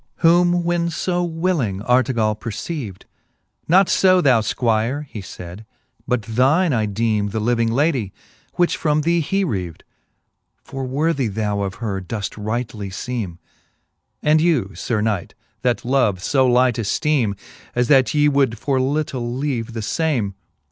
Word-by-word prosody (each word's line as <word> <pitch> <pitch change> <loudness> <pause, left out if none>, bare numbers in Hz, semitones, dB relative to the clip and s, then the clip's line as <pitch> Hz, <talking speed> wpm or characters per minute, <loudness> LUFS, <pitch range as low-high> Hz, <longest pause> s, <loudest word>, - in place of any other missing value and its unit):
XXVIII. 165 - +5
Whom 175 0 +3
when 170 0 0
fo 175 +2 -1
willing 160 - -1
Artegall 125 -3 +2
perceaved; 110 - -6 0.6
Not 185 +3 +5
fo, 185 -1 +4
thou 130 -9 +4
Squire, 115 +5 0
he 115 -7 -8
fayd, 90 +2 -9 0.4
but 125 -3 0
thine 135 - +2
I 110 -3 +1
deeme 105 0 0
The 110 +2 -3
living 115 +1 +1
lady, 130 - +1 0.4
which 175 -1 +2
from 150 -1 +1
thee 170 +2 +2
h,e 195 +5 0
reaved: 90 - -4 0.8
For 135 -1 -6
worthy 140 0 0
thou 105 -1 -2
of 100 0 -3
her 105 -4 -3
doefl; 105 +2 -5
rightly 110 -2 -3
feeme. 100 -4 -4 0.9
And 155 +1 +4
you, 145 - +1
Sir 110 -3 -2
knight, 105 -5 -2 0.3
that 125 -2 0
love 125 -7 +2
fo 130 +2 +3
light 125 -1 +3
efteeme, 115 -1 0 0.4
As 120 0 +2
that 135 -5 +5
ye 150 0 +4
would 140 -5 +2
for 135 +3 0
little 130 -3 -2
leave 125 -5 -2
the 115 -2 -4
fame. 125 -6 -1
125 Hz, 150 wpm, -21 LUFS, 110-150 Hz, 0.9 s, XXVIII